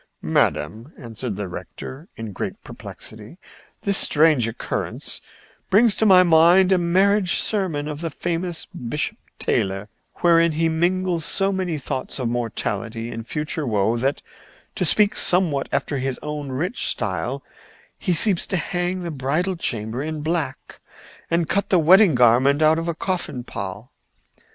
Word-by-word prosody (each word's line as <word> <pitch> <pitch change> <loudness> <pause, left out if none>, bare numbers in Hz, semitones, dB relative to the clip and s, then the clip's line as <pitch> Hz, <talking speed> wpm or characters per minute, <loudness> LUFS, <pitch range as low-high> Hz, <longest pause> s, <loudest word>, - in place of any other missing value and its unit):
"Madam," 115 +8 -1
answered 115 -3 -6
the 100 0 -4
rector, 130 - -9
in 110 -3 -7
great - - -6
perplexity, 110 +8 -9 0.5
"this 200 -1 +5
strange 150 -6 +4
occurrence 115 - -4 0.5
brings 215 +2 +4
to 220 - +2
my 185 -2 +7
mind 175 +3 +5
a 185 - +4
marriage 190 +2 +2
sermon 175 -9 0
of 150 0 -6
the 165 - -2
famous 170 +2 -3
Bishop 125 +5 -4 0.2
Taylor 95 +2 -1 0.3
wherein 170 -1 +4
he 165 +2 +1
mingles 175 +1 0
so 195 +5 +3
many 185 -4 -2
thoughts 130 -2 -4
of 130 -3 -2
mortality 115 -1 -3
and 115 0 -7
future 150 0 -3
woe 110 0 +1
that, 135 +4 -1 0.5
to - - -1
speak 210 -1 +3
somewhat 170 -7 +2
after 140 0 -1
his 130 0 -3
own 150 -2 -5
rich 170 - -2
style, - - -3 0.6
he 185 - -1
seems 185 +1 +3
to 190 - -1
hang 180 +2 -2
the 170 - -4
bridal 155 +7 -1
chamber 115 -5 -3
in 155 0 -4
black 155 -4 -3 0.5
and 170 -1 +1
cut 200 +5 -1
the 185 - +4
wedding 180 +2 +6
garment 125 +5 +4
out 155 +1 +4
of 165 - -4
a 170 - -2
coffin 165 -8 -3
pall. 100 +1 -7
155 Hz, 150 wpm, -22 LUFS, 125-180 Hz, 0.6 s, my